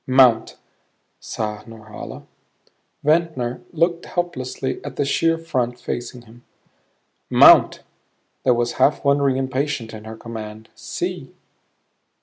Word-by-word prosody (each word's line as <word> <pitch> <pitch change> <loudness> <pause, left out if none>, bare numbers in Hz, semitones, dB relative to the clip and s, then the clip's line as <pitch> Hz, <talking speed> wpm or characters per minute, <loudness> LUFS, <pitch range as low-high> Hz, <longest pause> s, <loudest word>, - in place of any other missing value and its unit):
"Mount," 130 -3 +4 0.6
sighed 105 0 -5
Norhala. 110 -1 -10 0.8
Ventnor 150 -6 +1
looked 170 +1 0
helplessly 135 -7 -3
at - - -7
the 145 - 0
sheer 165 +4 +2
front 125 -7 -2
facing 120 0 -5
him. 120 +1 -18 0.9
"Mount." - - +7 0.6
There 125 - +4
was 120 0 0
half 150 - +3
wondering 140 -1 +3
impatience 135 -3 -2
in 110 0 -9
her 110 0 -8
command. 110 -1 -8
"See!" - - -5
125 Hz, 110 wpm, -21 LUFS, 115-145 Hz, 0.9 s, Mount